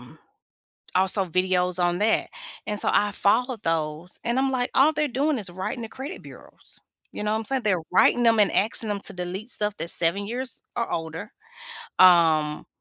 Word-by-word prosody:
um, - - -16 0.8
also 190 +1 +2
videos 180 0 0
on 175 +1 0
that, 220 +1 +2 0.4
and 210 0 -3
so, - - -1
I 205 0 +2
followed 230 +4 0
those 160 +1 -3
and 240 +2 0
I'm 270 0 +1
like, 250 -1 -1
"All 295 +4 +4
they're 300 0 0
doing 280 +2 0
is 200 -4 -5
writing 210 +7 -5
the 225 - -7
credit 275 +10 -8
bureaus," - - -13 0.3
you - - -6
know 210 - -1
what 220 - +1
I'm 220 - -7
saying? 265 +2 -1
They're 195 -4 +1
writing 240 0 +4
'em 225 -1 +4
and 205 - +4
asking 220 +1 0
them 205 -1 -2
to - - -6
delete 185 +5 -6
stuff 210 -1 +1
that's 170 - +2
7 175 +4 +3
years 250 +2 -5
or 235 - -2
older. 160 +3 -5 0.7
Um, 160 -4 +4
205 Hz, 190 wpm, -24 LUFS, 180-240 Hz, 0.8 s, All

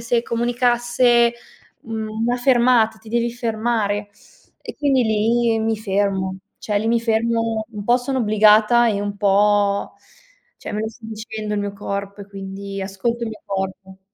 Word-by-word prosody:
se 235 0 0
comunicasse, 240 0 +2 0.5
mhmm, 220 -1 -5 0.2
una 245 +1 +1
fermata. 240 -3 +3
Ti 220 0 -15
devi 235 +1 0
fermare." 220 -3 -1 0.5
E - - -8
quindi 270 -4 +2
lì 225 +1 +2
mi 220 0 0
fermo. 195 -2 -1 0.2
Cioè, 210 - -2
lì 220 +2 -1
mi 235 +1 +3
fermo 225 -1 0
un 210 -2 -7
po' 240 +3 +4
sono 260 +1 -2
obbligata 215 +1 +5
e 205 -2 0
un 205 0 -4
po' 205 0 +2 0.6
cioè, - - -8
me 210 - -2
lo 220 - -2
sta 225 +1 -16
dicendo 220 -1 -5
il 205 - -1
mio 205 0 -3
corpo, 200 0 -5
e - - -12
quindi 195 0 -7
ascolto 200 +5 -3
il 230 - -2
mio 220 - -9
corpo. 190 -1 -5
220 Hz, 160 wpm, -21 LUFS, 205-235 Hz, 0.6 s, obbligata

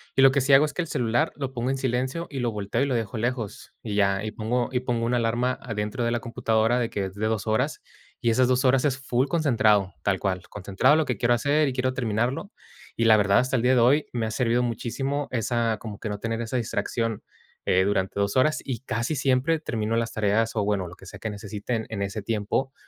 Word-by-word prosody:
y - - +4
lo 135 0 +8
que 140 - +2
sí 135 +2 +1
hago 135 +3 +7
es 150 - -5
que 180 - -1
el 165 - -4
celular 120 +7 +1
lo 135 -2 -4
pongo 125 0 -2
en 135 - 0
silencio 130 +6 -2
y 140 - -5
lo 120 -2 0
volteo 105 +3 -2
y - - +3
lo 135 -3 -1
dejo 115 -1 -2
lejos, 120 -2 -3
y 105 -2 -4
ya, 100 -1 +2
y 110 - -3
pongo 120 +3 -1
y 125 - +1
pongo 120 -2 -1
una 120 +1 +1
alarma 120 +2 0 0.2
dentro 105 +3 -2
de 115 - +1
la 120 - 0
computadora 115 +1 +1
de 120 -2 -1
que 100 -4 -2
es 95 0 -8
de 110 +1 -1
2 110 -1 -2
horas, 125 +7 0 0.4
y 120 - +2
esas 125 +2 +3
2 130 +2 +2
horas 130 0 +4
es 135 -3 +1
full 130 0 0
concentrado, 110 - +2
tal 95 -2 +1
cual, 95 -2 -2
concentrado 100 +7 +2
lo 160 - +2
que 125 - -2
quiero 120 0 +2
hacer 145 +5 +2
y - - -4
quiero 130 0 0
terminarlo, 125 - -1 0.5
y 115 - +1
la 110 -1 +7
verdad, 100 -1 +4
hasta 130 +1 0
el 120 - +2
día 125 +2 +3
de - - +4
hoy, 140 +6 +4
me 115 -2 -1
ha 110 - -3
servido 120 0 +1
muchísimo 135 +5 -2
esa, 115 -1 0
como 105 -3 -7
que 110 - -4
no 105 0 -4
tener 115 +1 -2
esa 115 +2 -2
distracción, 115 -1 -2 0.4
eh, 95 +1 +3
durante 100 -1 0
2 100 0 0
horas, 145 +4 +3
y 130 -4 -3
casi 120 +4 -2
siempre 135 +4 +2
termino 110 -6 -2
las 115 0 0
tareas, 110 +1 +1
o 105 - +1
bueno, 100 -3 0
lo 85 - -11
que 95 - -16
sea 100 - -10
que 110 - -3
necesite 105 +2 -4
en 110 -3 -4
ese 100 +2 -3
tiempo, 110 +6 -1
115 Hz, 245 wpm, -25 LUFS, 105-130 Hz, 0.5 s, lo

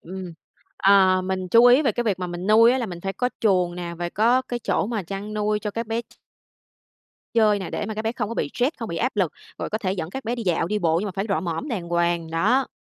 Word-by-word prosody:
ừm, 185 0 -8 0.4
ờ, 190 -1 +5
mình 185 -1 -3
chú 230 +6 +6
ý 250 +5 +6
về 270 - +2
cái 240 - -2
việc 205 -5 0
mà 180 - -3
mình 175 +1 -5
nuôi 230 +3 +6
á, 260 - +1
là 240 - -2
mình 175 -4 -7
phải 195 +2 -3
có 250 +6 -1
chuồng 180 -5 +2
nè, 175 -1 -5
và 175 0 -2
có 235 +7 +2
cái 245 - -4
chỗ 225 - 0
mà 220 -2 -2
chăn 195 +4 -6
nuôi 210 0 0
cho 210 -1 -4
các 230 +2 -4
bé 225 +1 -1
ch - - -24 1.2
chơi 215 -3 +4
nè, 190 - -6
để - - -3
mà 220 - -4
các 215 - -3
bé 225 +1 -1
không 215 -4 -3
có 230 - -5
bị - - -2
stress, 255 +6 0
không 230 - -5
bị 170 - -4
áp 250 +5 -1
lực, 185 -6 +1 0.3
rồi - - -3
có 215 - -1
thể 190 -4 -1
dẫn 170 -4 -4
các 265 +6 -6
bé 235 +2 -1
đi 235 - -5
dạo, 175 -4 0
đi 210 +4 -1
bộ 165 -3 +2
nhưng 210 - -3
mà - - -3
phải 195 +1 -2
rọ 195 - +1
mõm 175 - -4
đàng 190 -10 -4
hoàng. 170 -1 0
Đó. 225 +11 +2
205 Hz, 285 wpm, -23 LUFS, 180-230 Hz, 1.2 s, chú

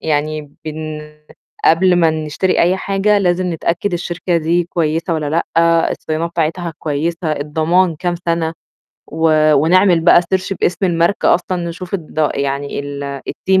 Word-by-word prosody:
يعني 150 -1 -2
بن 155 0 -5 0.6
قبل 180 +2 +4
ما 165 -2 +4
نشتري 155 +4 -1
أي 180 +2 +2
حاجة 200 +2 +1
لازم 180 -1 0
نتأكد 170 +4 -2
الشركة 175 0 -2
دي 170 +2 +1
كويسة 165 0 -1
والّا 150 -2 -2 0.3
لأ، 165 0 +3
الصيانات 160 +2 -3
بتاعتها 170 +1 -2
كويسة، 160 +2 -2
الضمان 160 +4 +1
كام 175 +2 -2
سنة 165 -1 0 0.5
و 155 -1 +2
ونعمل 175 +4 +4
بقى 170 +1 +6
search 185 +2 -2
باسم 175 +2 0
الماركة 170 +2 +2
أصلًا 180 0 -2
نشوف 180 +2 -7
الض 155 -4 -1
يعني 140 +1 -2
ال 140 -1 -6
الteam 190 0 +1
165 Hz, 140 wpm, -17 LUFS, 155-180 Hz, 0.6 s, بقى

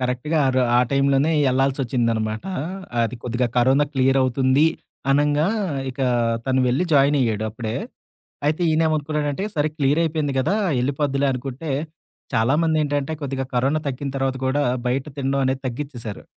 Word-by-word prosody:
కరెక్ట్‌గా 125 +5 -1
ఆరు 130 0 +2 0.2
ఆ - - +6
టైంలోనే 140 +3 +2 0.2
ఎళ్ళాల్సొచ్చిందనమాట. 120 -3 0 0.6
అది 115 +2 -2
కొద్దిగా 120 +1 0
కరోనా 130 +4 +4
క్లియర్ 135 +1 +3
అవుతుంది, 130 +3 +3 0.4
అనంగా 145 +3 +3 0.4
ఇక 130 - -9 0.5
తను 130 0 +2
వెళ్లి 135 +9 +1
జాయిన్ 140 0 +4
అయ్యాడు 110 -3 0
అప్పుడే. 110 0 -5 0.7
అయితే 155 +4 +1
ఈయనేమనుకున్నానంటే, 155 +1 0
సరే 150 +1 +2
క్లియర్ 145 +2 +2
అయిపోయింది 150 -3 -1
గదా! 165 +10 +1 0.2
ఎళ్ళిపోద్దులే 140 +1 0
అనుకుంటే, 135 +4 -5 0.6
చాలామందేంటంటే 145 +3 +1
కొద్దిగా 135 -1 -2
కరోనా 135 +5 +2
తగ్గిన 140 +1 -4
తర్వాత 135 0 -1
గూడా 140 +3 +1 0.3
బయట 130 +2 0
తినడం 135 0 0
అనేది 130 0 -1
తగ్గిచ్చేేశారు. 125 -4 -6
135 Hz, 130 wpm, -22 LUFS, 125-145 Hz, 0.7 s, ఆ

